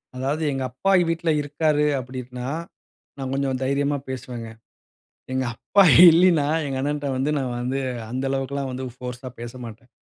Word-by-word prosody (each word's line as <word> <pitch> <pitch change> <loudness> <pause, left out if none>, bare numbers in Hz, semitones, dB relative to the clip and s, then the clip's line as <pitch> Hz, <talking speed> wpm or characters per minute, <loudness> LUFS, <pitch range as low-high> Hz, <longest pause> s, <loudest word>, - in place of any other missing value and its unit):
அதாவது 140 +5 -2
எங்க 135 -1 -2
அப்பா 160 +10 0 0.2
வீட்ல 165 0 -1
இருக்காரு 150 +1 +1
அப்டின்னா, 125 0 -7 0.7
நான் 135 -1 -4
கொஞ்சம் 135 -1 -1
தைரியமா 140 +2 0
பேசுவேங்க. 120 -3 -6 0.8
எங்க 130 0 0
அப்பா 200 - +3 0.3
இல்லின்னா 165 -3 +4 0.2
எங்க 135 -1 -3
அண்ணன்ட்ட 145 +1 -2
வந்து 135 +3 0
நான் 130 -3 -2
வந்து 130 +2 -2 0.3
அந்த 130 +2 -3
அளவுக்கு 135 0 -2
எல்லாம் 140 -1 -2
வந்து 130 +1 -5 0.2
போர்ஸ்ஸா 125 0 -6
பேசமாட்டேன். 120 -1 -9
135 Hz, 145 wpm, -23 LUFS, 125-145 Hz, 0.8 s, இல்லின்னா